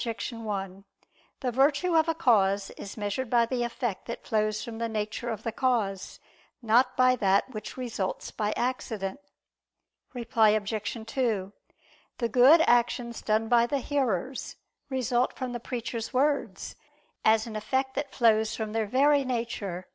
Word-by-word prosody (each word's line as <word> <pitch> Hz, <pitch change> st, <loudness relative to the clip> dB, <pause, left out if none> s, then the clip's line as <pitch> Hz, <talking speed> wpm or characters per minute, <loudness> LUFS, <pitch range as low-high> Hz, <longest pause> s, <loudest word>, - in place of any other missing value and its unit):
1: 200 Hz, -4 st, -5 dB, 0.6 s
The 255 Hz, -2 st, -1 dB
virtue 290 Hz, +7 st, +2 dB
of 320 Hz, 0 st, +4 dB
a 325 Hz, -, +1 dB
cause 200 Hz, -9 st, +2 dB
is 200 Hz, -, -9 dB
measured 210 Hz, +4 st, -3 dB
by 235 Hz, -1 st, +4 dB
the 245 Hz, +1 st, -2 dB
effect 240 Hz, -3 st, -3 dB
that 235 Hz, -, -6 dB
flows 215 Hz, -1 st, 0 dB
from 230 Hz, -1 st, -7 dB
the 230 Hz, 0 st, -1 dB
nature 220 Hz, +2 st, -3 dB
of 220 Hz, -2 st, -4 dB
the 230 Hz, -, -2 dB
cause, 220 Hz, -7 st, -1 dB, 0.4 s
not 235 Hz, +2 st, +2 dB
by 255 Hz, 0 st, +5 dB
that 200 Hz, +4 st, +2 dB
which 215 Hz, 0 st, -7 dB
results 230 Hz, -7 st, -4 dB
by 210 Hz, -1 st, -1 dB
accident. 235 Hz, -3 st, -3 dB, 1.0 s
Reply 225 Hz, -3 st, +3 dB
Obj. 215 Hz, +2 st, -4 dB
2: 220 Hz, -5 st, -1 dB, 0.6 s
The 235 Hz, -2 st, -1 dB
good 260 Hz, +8 st, +7 dB
actions 240 Hz, -3 st, +1 dB
done 215 Hz, +1 st, +1 dB
by 235 Hz, 0 st, +4 dB
the 280 Hz, -, 0 dB
hearers, 260 Hz, -4 st, -2 dB, 0.3 s
result 255 Hz, -1 st, 0 dB
from 255 Hz, -1 st, -5 dB
the 240 Hz, -, -3 dB
preacher's 235 Hz, -1 st, -4 dB
words, 280 Hz, +2 st, 0 dB, 0.5 s
as 220 Hz, 0 st, +4 dB
an 225 Hz, -2 st, -7 dB
effect 265 Hz, +5 st, -1 dB
that 280 Hz, +1 st, -3 dB
flows 220 Hz, -2 st, +3 dB
from 220 Hz, -1 st, -4 dB
their 225 Hz, -1 st, 0 dB
very 280 Hz, +5 st, +3 dB
nature. 230 Hz, -8 st, -3 dB
235 Hz, 150 wpm, -28 LUFS, 215-255 Hz, 1.0 s, good